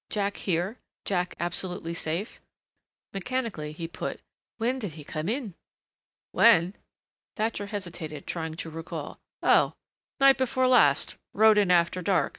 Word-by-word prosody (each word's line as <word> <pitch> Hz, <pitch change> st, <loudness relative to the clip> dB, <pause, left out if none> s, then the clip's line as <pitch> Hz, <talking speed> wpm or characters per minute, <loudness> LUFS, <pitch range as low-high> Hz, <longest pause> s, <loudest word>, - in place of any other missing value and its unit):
Jack 200 Hz, -1 st, -1 dB
here 185 Hz, +6 st, -1 dB, 0.3 s
Jack 180 Hz, -2 st, -1 dB
absolutely 175 Hz, -1 st, -3 dB
safe 170 Hz, +6 st, -4 dB, 0.7 s
Mechanically 200 Hz, -7 st, -3 dB
he 165 Hz, +2 st, -5 dB
put, 170 Hz, -, -5 dB, 0.4 s
"When 245 Hz, +3 st, 0 dB
did 205 Hz, -9 st, -5 dB
he 155 Hz, -1 st, -10 dB
come 155 Hz, +4 st, -4 dB
in?" 235 Hz, -5 st, -2 dB, 0.8 s
"When?" 190 Hz, -4 st, +5 dB, 0.6 s
Thatcher 215 Hz, -2 st, -1 dB
hesitated, 170 Hz, -7 st, -6 dB
trying 160 Hz, -2 st, -4 dB
to 165 Hz, 0 st, -6 dB
recall. 165 Hz, +1 st, -6 dB, 0.2 s
"Oh, -, -, +4 dB, 0.4 s
night 275 Hz, -1 st, +6 dB
before 260 Hz, 0 st, +1 dB
last 190 Hz, -, +4 dB, 0.2 s
rode 215 Hz, 0 st, +6 dB
in 200 Hz, -3 st, +2 dB
after 175 Hz, +1 st, +3 dB
dark." 185 Hz, +1 st, +2 dB
185 Hz, 130 wpm, -27 LUFS, 165-220 Hz, 0.8 s, night